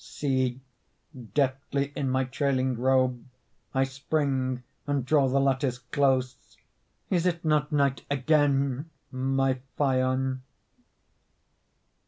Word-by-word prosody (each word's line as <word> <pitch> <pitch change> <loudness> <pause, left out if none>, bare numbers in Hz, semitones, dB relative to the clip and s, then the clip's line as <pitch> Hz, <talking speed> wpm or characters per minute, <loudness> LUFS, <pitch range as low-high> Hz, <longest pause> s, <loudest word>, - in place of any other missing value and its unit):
See, 130 -3 -1 0.8
deftly 140 0 0
in 135 - -1
my 130 +1 +1
trailing 130 -1 0
robe 130 0 +2 0.5
I 135 - +2
spring 135 -2 -1 0.2
and 140 -3 0
draw 140 -1 +3
the 135 +2 +2
lattice 135 -2 +1
close; 130 -1 -1 0.5
Is 180 -1 +2
it 170 -2 -2
not 150 -1 +2
night 140 -4 +1
again, 140 0 +1 0.2
my 135 0 0 0.2
Phaon? 130 -1 +1
135 Hz, 100 wpm, -27 LUFS, 130-140 Hz, 0.8 s, draw